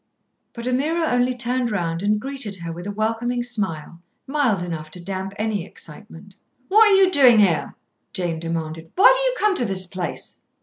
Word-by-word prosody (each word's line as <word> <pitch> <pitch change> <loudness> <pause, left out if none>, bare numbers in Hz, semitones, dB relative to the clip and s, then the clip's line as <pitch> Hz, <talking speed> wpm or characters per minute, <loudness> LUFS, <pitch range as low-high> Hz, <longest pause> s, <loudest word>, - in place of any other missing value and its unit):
But 235 0 -6
Ameerah 310 +6 0
only 245 +1 +1
turned 245 0 0
round 170 -5 -2
and 210 +1 +1
greeted 265 -4 -5
her 170 -2 -7
with 175 +3 -7
a - - -3
welcoming 225 +3 -1
smile, 190 -8 -4 0.2
mild 260 - 0
enough 160 -3 -6
to 180 - -9
damp 190 +2 -5
any 215 -3 -2
excitement. 185 +2 -12 0.3
"What 435 +2 +6
are 400 - +5
you 385 -1 +5
doing 260 -8 +6
here?" 175 -9 +2 0.4
Jane 175 -4 -2
demanded. 165 -1 -5
"Why 455 +7 +7
do - - -1
you - - -3
come 425 -2 +2
to 245 - +2
this 190 -3 0
place?" 180 -1 -5
210 Hz, 180 wpm, -22 LUFS, 175-255 Hz, 0.4 s, Why